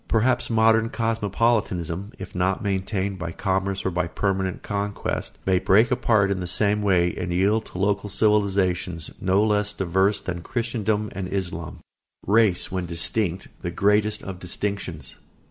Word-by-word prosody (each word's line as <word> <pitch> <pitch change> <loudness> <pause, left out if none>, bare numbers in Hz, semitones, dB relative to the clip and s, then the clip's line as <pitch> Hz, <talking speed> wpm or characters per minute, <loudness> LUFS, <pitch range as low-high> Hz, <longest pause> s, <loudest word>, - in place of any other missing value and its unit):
Perhaps 120 +3 +2
modern 115 0 +4
cosmopolitanism, 110 - 0
if - - -8
not 95 +4 0
maintained 95 -1 -1
by 85 -2 -4
commerce 95 +2 -1
or 95 - +1
by 90 0 -1
permanent 95 0 -2
conquest, 100 0 -3
may 95 -1 +3
break 110 +8 +4
apart 110 -5 +3
in 95 - -1
the 90 - -4
same 105 +3 +1
way 90 -4 +2
and 90 -1 -3
yield 100 +5 +2
to - - -9
local 100 +1 0
civilisations 95 -6 +1
no 95 +3 +3
less 105 -1 +1
diverse 95 +3 +1
than 90 -2 -5
Christendom 110 -1 -1
and 95 -1 -4
Islam. 90 -4 -4 0.4
[Sidenote: 100 - -1
Race, 110 -5 +3
when 90 -1 -2
distinct, 90 +2 0
the 90 - -3
greatest 105 +4 +2
of 95 -1 -7
distinctions. 90 -5 -4
100 Hz, 150 wpm, -24 LUFS, 90-105 Hz, 0.4 s, modern